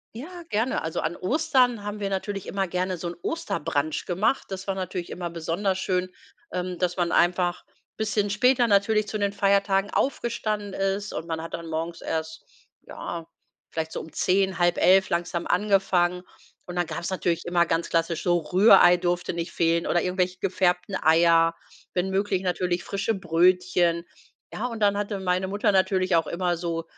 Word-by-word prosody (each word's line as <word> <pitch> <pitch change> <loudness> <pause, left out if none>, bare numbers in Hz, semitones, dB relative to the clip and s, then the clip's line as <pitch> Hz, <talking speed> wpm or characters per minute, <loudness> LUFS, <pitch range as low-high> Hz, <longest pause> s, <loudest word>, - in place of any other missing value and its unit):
Ja, 345 +8 -8
gerne. 225 +5 0
Also 160 0 -3
an 160 +2 -2
Ostern 250 - +1
haben 210 0 -5
wir 195 - -1
natürlich 195 0 -3
immer 195 -1 -2
gerne 180 +1 -2
so 175 - -5
'n 170 - -5
Osterbrunch 155 - -2
gemacht. 190 +9 0
Das 190 0 -6
war 195 - -1
natürlich 185 -2 -4
immer 175 -1 -5
besonders 170 +4 -2
schön, 185 -1 -1 0.4
ähm, 180 0 -3
dass 180 +1 -1
man 175 -1 0
einfach 175 0 +2 0.3
bisschen 210 -1 0
später 245 +4 +3
natürlich 210 +1 +2
zu 215 - -3
den 200 -1 0
Feiertagen 200 0 +2
aufgestanden 215 -6 -1
ist 195 +2 -2
und 165 - -5
man 160 -1 -3
hat 165 - -8
dann 170 0 -5
morgens 165 +2 -4
erst, 160 0 -4 0.4
ja, 170 -1 -7 0.4
vielleicht 160 0 -4
so - - -4
um 160 - -11
10:00, 190 0 +1
10:30 185 +2 +4
langsam 170 0 -2
angefangen 180 -2 +2 0.4
und 180 - -7
dann 175 -1 0
gab's 170 +2 -4
natürlich 175 -3 -1
immer 175 0 +2
ganz 165 0 -1
klassisch 165 0 0
so 175 -1 +3
Rührei 180 +1 +6
durfte 175 0 -1
nicht 170 0 -4
fehlen 170 0 +1
oder 175 - +2
irgendwelche 180 0 -1
gefärbten 180 0 0
Eier, 165 +1 +4 0.4
wenn 180 +1 0
möglich 190 -1 0
natürlich 180 -1 -1
frische 200 +3 -1
Brötchen. 175 -1 +2 0.5
Ja, 225 - -3
und 230 -3 -5
dann 200 -1 +3
hatte 205 -1 -3
meine 185 0 0
Mutter 205 +2 +1
natürlich 185 -2 +2
auch 165 -2 0
immer 175 0 -1
so 165 -1 -3
185 Hz, 170 wpm, -25 LUFS, 170-200 Hz, 0.5 s, Rührei